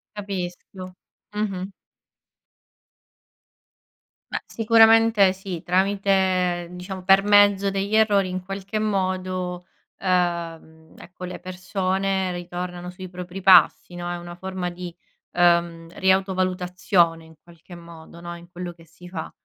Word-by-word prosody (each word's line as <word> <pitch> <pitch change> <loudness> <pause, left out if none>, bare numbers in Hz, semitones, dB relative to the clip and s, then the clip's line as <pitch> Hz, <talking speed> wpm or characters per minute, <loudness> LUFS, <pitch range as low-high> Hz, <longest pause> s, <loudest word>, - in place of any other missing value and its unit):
Capisco, 185 -2 -6 0.4
mh-mh. 195 -2 -3 2.6
Ma - - -2
sicuramente 225 -3 +5
sì, 190 -3 -7
tramite 185 -1 +1
diciamo, 180 +1 -7
per 195 +1 +6
mezzo 205 -1 +4
degli 195 +2 -2
errori 205 -3 +3
in 185 0 -4
qualche 195 +3 -5
modo, 185 -3 -2 0.3
ehm, 170 -3 -2
ecco, 180 0 -11
le 180 0 -6
persone 185 +1 -2
ritornano 175 0 -6
sui 180 0 -9
propri 180 +1 -8
passi, 185 -1 +5
no, 175 0 -5
è 175 - -3
una 175 0 -9
forma 185 0 -4
di 175 -1 -8 0.4
ehm, 170 -1 +2
ri-autovalutazione 185 -3 +1
in 160 - -17
qualche 170 +1 -15
modo, 170 0 -13
no, 175 0 -6
in 170 0 -14
quello 175 0 -6
che 165 -1 -19
si 170 +2 -16
fa. 175 -3 -6
185 Hz, 115 wpm, -23 LUFS, 175-195 Hz, 2.6 s, per